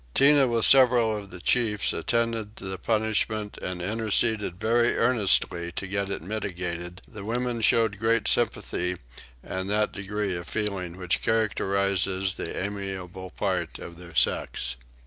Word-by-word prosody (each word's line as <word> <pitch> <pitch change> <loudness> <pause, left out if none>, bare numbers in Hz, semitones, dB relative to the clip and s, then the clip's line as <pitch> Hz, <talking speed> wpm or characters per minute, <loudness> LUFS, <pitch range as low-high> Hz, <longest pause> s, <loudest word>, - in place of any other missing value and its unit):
Tinah 140 -1 +6
with 115 -2 +3
several 125 -4 +6
of 100 -2 -7
the 90 - -10
chiefs 105 0 +2
attended 115 -2 -1
the 95 -1 -6
punishment 110 0 0
and 90 -1 -4
interceded 110 -2 0
very 120 +2 +2
earnestly 100 -7 +1
to - - -4
get 100 0 -2
it 100 - -4
mitigated: 90 -3 -4
the 105 -4 -9
women 120 +2 -2
showed 110 -2 +3
great 115 0 +1
sympathy 90 +1 0 0.5
and 95 +1 -4
that 105 +1 +1
degree 100 -1 -3
of 85 -1 -6
feeling 95 -5 -2
which 90 -2 -1
characterises 100 -3 +1
the - - -5
amiable 95 -2 -5
part 90 -4 -2
of 85 0 -10
their 85 -2 -12
sex. 60 -1 +1
100 Hz, 140 wpm, -26 LUFS, 95-110 Hz, 0.5 s, Tinah